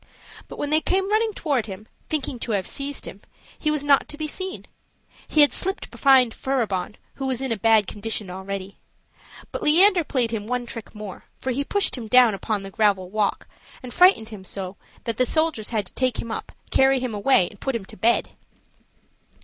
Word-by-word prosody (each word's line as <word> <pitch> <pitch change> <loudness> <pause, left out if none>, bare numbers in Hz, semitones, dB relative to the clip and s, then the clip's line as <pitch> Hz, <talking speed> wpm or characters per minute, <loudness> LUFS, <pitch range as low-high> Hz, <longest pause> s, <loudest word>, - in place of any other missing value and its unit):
But - - -10
when 290 - -3
they 310 +1 +3
came 385 +3 0
running 440 +1 +2
toward 275 -8 -1
him, 205 +2 -9 0.2
thinking 280 -5 -2
to 230 - -3
have 195 -3 0
seized 280 +1 -4
him, - - -10 0.4
he 305 - 0
was 300 -2 0
not 285 -1 +4
to 295 - -7
be 310 0 -3
seen; 375 +4 -5 0.6
he 305 - +4
had 290 - +6
slipped 385 +1 -2
behind 260 -4 +4
Furibon, 210 -8 -2 0.2
who 270 - -3
was 260 -2 -1
in 265 -2 -3
a - - +2
bad 220 0 +4
condition 210 0 -3
already. 190 +1 -6 0.7
But - - -4
Leander 355 +4 +6
played 250 -6 0
him 215 -2 -4
one 250 0 -2
trick 230 -2 -8
more; 210 -3 -8
for 260 - -3
he 275 +3 -1
pushed 395 -4 0
him 225 - -7
down 245 -1 +6
upon 205 +1 -2
the 195 - -8
gravel 195 -3 +1
walk, 210 -1 -1 0.4
and 250 - -7
frightened 355 - +5
him 210 -4 -9
so 190 0 -6 0.3
that 230 -1 -3
the 255 - +3
soldiers 315 -9 0
had 215 -3 -1
to - - -13
take 255 -2 0
him 230 - -5
up, - - -5 0.2
carry 270 0 +4
him 250 -3 -3
away, 205 -3 +3
and 200 - -18
put 270 -2 -1
him 215 -4 -4
to - - -13
bed. 230 +5 +2
240 Hz, 205 wpm, -24 LUFS, 210-285 Hz, 0.7 s, had